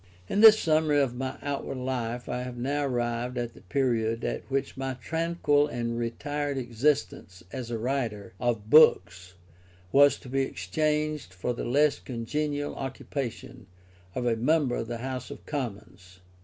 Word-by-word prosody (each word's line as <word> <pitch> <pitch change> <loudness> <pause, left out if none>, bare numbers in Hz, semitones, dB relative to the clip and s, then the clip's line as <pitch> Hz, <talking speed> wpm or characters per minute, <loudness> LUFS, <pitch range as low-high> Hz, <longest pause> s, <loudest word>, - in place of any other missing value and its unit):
In 205 - +1
this 220 -1 +10
summary 155 -4 +2
of 135 -4 +1
my 130 +2 -4
outward 140 -1 -3
life 125 -2 -3
I 125 - -2
have 125 -1 -6
now 140 +4 -1
arrived 120 0 -2
at 120 -1 -3
the - - -16
period 115 0 0
at - - -3
which 135 0 -1
my 135 0 -3
tranquil 160 +1 +1
and 120 -4 -3
retired 145 +5 -2
existence 115 -7 -1
as 125 -3 -5
a 115 - -2
writer 115 -5 -2
of 120 -4 -1
books 95 - +5 0.6
was 140 0 +6
to - - -12
be 135 +2 0
exchanged 150 - -1
for 120 +7 -2
the - - -5
less 145 +4 +3
congenial 145 +4 -3
occupation 130 -3 -5 0.5
of 125 - -2
a 120 -1 +2
member 130 +2 +2
of 115 - -3
the 120 0 -4
House 130 +1 -5
of - - -10
Commons. 100 - -6
130 Hz, 155 wpm, -28 LUFS, 115-145 Hz, 0.6 s, this